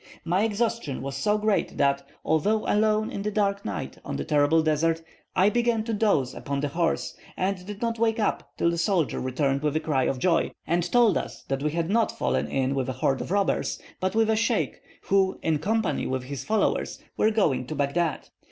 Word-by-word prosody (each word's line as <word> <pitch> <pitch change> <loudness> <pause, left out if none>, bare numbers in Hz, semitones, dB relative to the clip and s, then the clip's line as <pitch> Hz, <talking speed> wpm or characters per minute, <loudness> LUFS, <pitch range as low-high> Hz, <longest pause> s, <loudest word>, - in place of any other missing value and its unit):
My 175 +3 +2
exhaustion 220 - -1
was 135 0 -4
so 210 +10 +1
great 210 -1 0
that, 140 -1 +2 0.2
although 205 +8 +2
alone 215 +1 +2
in 200 - -4
this 210 +1 -2
dark 200 -1 +1
night - - -5
on - - -4
the - - -3
terrible 150 +1 +3
desert, 160 +1 +1 0.3
I 190 +3 +4
began 235 -2 +1
to 225 0 -3
doze 200 - +2
upon 140 0 -3
the 145 - -1
horse, 165 +2 -1 0.2
and 185 0 -1
did 205 +2 -6
not 230 -1 -1
wake 225 0 +2
up 210 - -1
till 170 - +2
the 170 - -2
soldier 170 -4 +1
returned 135 +2 0
with 150 0 0
a - - +3
cry 145 -5 0
of 135 - 0
joy, 165 +5 +1
and 170 +1 0
told 235 -5 +5
us - - -8
that 135 0 -1
we 150 - +1
had 165 +3 -1
not 230 +1 +2
fallen 65 +3 0
in 135 - 0
with 135 -2 -1
a - - -1
horde 130 +1 0
of - - -5
robbers, 200 +1 0 0.2
but 185 +2 -1
with 220 0 +3
a - - +3
sheikh, 225 - 0 0.2
who, 195 -1 +2
in 160 -2 +1
company 220 +7 0
with 130 -1 -2
his 140 +1 -6
followers, 215 -1 0
were 215 - +3
going 155 - +1
to 155 - -4
Baghdad. 150 +3 -1
170 Hz, 210 wpm, -26 LUFS, 140-215 Hz, 0.3 s, told